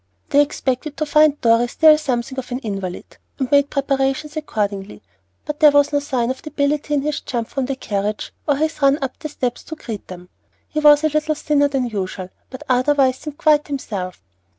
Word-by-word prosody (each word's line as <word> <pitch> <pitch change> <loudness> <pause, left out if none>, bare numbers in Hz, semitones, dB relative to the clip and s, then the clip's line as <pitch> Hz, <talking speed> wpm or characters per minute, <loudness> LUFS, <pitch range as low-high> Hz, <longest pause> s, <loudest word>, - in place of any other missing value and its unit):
They 285 - +5
expected 280 0 -2
to 310 - -1
find 300 0 +4
Dorry 230 0 +4
still 310 +5 +6
something 265 -3 -2
of 250 -1 -8
an 245 - -1
invalid, 195 -4 -6 0.2
and 265 -3 -3
made 285 0 +4
preparations 275 +2 -1
accordingly; 205 - -3 0.4
but 300 0 -5
there 305 - +8
was 285 0 +3
no 290 - +3
sign 255 -4 -1
of 260 - -7
debility 295 0 -1
in 275 - 0
his 300 0 -2
jump 235 -3 -4
from 270 -2 -2
the 275 - -2
carriage 210 -4 -3
or 290 - +3
his 310 +1 -2
run 275 0 +4
up 260 - -4
the 305 - -5
steps 250 -4 -3
to 315 - -7
greet 225 -9 -7
them. 180 -1 -10 0.4
He 305 - -3
was 295 0 +6
a 310 - +3
little 305 +1 0
thinner 290 -1 +2
than 270 -3 -1
usual, 190 -4 -4 0.2
but 260 - -9
otherwise 260 0 +2
seemed 300 -2 -8
quite 300 -1 +3
himself. 200 -10 -5
275 Hz, 200 wpm, -20 LUFS, 240-295 Hz, 0.4 s, there